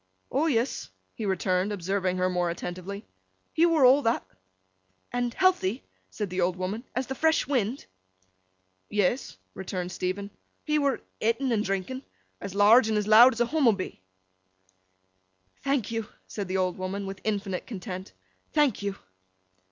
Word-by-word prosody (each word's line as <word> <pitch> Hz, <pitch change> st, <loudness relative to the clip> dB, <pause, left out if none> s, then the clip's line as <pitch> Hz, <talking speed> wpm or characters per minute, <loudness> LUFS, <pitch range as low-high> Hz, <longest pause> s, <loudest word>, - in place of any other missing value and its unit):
'O 295 Hz, +5 st, +2 dB
yes,' 240 Hz, -, 0 dB, 0.2 s
he 215 Hz, -, -4 dB
returned, 190 Hz, 0 st, +1 dB
observing 190 Hz, -1 st, -1 dB
her 185 Hz, 0 st, +2 dB
more 180 Hz, -1 st, 0 dB
attentively, 185 Hz, +4 st, -5 dB, 0.5 s
'he 335 Hz, +2 st, +4 dB
were 320 Hz, -5 st, +4 dB
all 265 Hz, +3 st, +7 dB
that.' 230 Hz, -2 st, 0 dB, 0.9 s
'And 245 Hz, -1 st, 0 dB
healthy,' 360 Hz, -, +2 dB, 0.3 s
said 210 Hz, -4 st, -4 dB
the 185 Hz, 0 st, -1 dB
old 175 Hz, 0 st, +1 dB
woman, 190 Hz, +5 st, -3 dB
'as 255 Hz, +1 st, 0 dB
the 265 Hz, -, -4 dB
fresh 320 Hz, +3 st, +2 dB
wind?' 250 Hz, -1 st, -1 dB, 1.0 s
'Yes,' 210 Hz, +5 st, 0 dB, 0.2 s
returned 180 Hz, -1 st, -4 dB
Stephen. 190 Hz, +3 st, -3 dB, 0.3 s
'He 300 Hz, 0 st, +1 dB
were 280 Hz, -2 st, +1 dB, 0.2 s
ett'n 230 Hz, +4 st, +1 dB
and 215 Hz, -2 st, +2 dB
drinking—as 195 Hz, 0 st, -6 dB
large 215 Hz, +3 st, +6 dB
and 215 Hz, -, +1 dB
as 210 Hz, -, 0 dB
loud 235 Hz, +4 st, +8 dB
as 235 Hz, -, -3 dB
a -, -, +5 dB
Hummobee.' 235 Hz, -, +1 dB, 1.6 s
'Thank 275 Hz, -6 st, 0 dB
you!' 225 Hz, -2 st, -2 dB, 0.2 s
said 200 Hz, -3 st, -5 dB
the 185 Hz, +1 st, -1 dB
old 185 Hz, -1 st, 0 dB
woman, 195 Hz, +2 st, -3 dB
with 195 Hz, -1 st, -7 dB
infinite 200 Hz, -3 st, -2 dB
content. 185 Hz, -3 st, -6 dB, 0.4 s
'Thank 295 Hz, -9 st, +3 dB
you! 200 Hz, -1 st, -2 dB
210 Hz, 145 wpm, -27 LUFS, 185-250 Hz, 1.6 s, loud